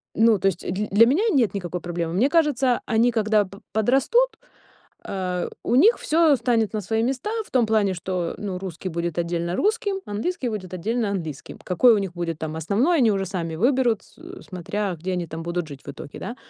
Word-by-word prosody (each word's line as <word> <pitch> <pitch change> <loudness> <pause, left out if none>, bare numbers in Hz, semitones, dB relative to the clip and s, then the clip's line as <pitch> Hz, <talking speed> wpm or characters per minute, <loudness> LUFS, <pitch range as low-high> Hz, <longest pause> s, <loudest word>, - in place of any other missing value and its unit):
Ну 225 -3 +4
то 195 - +2
есть 185 -2 -1
дль 205 +4 -2
для 215 +4 +7
меня 300 - +2
нет 240 - +2
никакой 180 -2 -4
проблемы. 170 -1 -3
Мне 225 +10 +3
кажется, 275 -6 +2
они 235 +1 +3
когда 215 -2 +2
п 195 +2 -13
подрастут, 270 - +2 0.7
э, 180 -2 -3 0.2
у 240 - 0
них 415 - +6
всё 315 -2 +3
встанет 230 -4 +1
на 215 - -2
свои 220 +4 -1
места 265 - -1 0.2
в - - -20
том 250 -3 +3
плане, 210 -3 +2
что, 180 -1 -3
ну, 190 -3 -4
русский 185 -1 -5
будет 170 -1 -3
отдельно 170 +1 -1
русским, 415 -2 0
английский 250 - -2
будет 195 -5 -5
отдельно 220 +5 -1
английским. 160 -7 -5
Какой 225 +7 +5
у 210 - +2
них 195 -3 -3
будет 170 -2 -3
там 160 -1 -4
основной, 225 - +1
они 235 -4 +4
уже 195 -1 -1
сами 165 -3 -4
выберут, 240 - +2
с - - -23 0.3
смотря, 190 +2 -3
где 180 +4 -4
они 175 -1 -2
там 160 +1 -6
будут 170 0 -3
жить 140 -2 -9
в - - -6
итоге, 145 - -10
да. 240 - -6
205 Hz, 205 wpm, -23 LUFS, 175-245 Hz, 0.7 s, для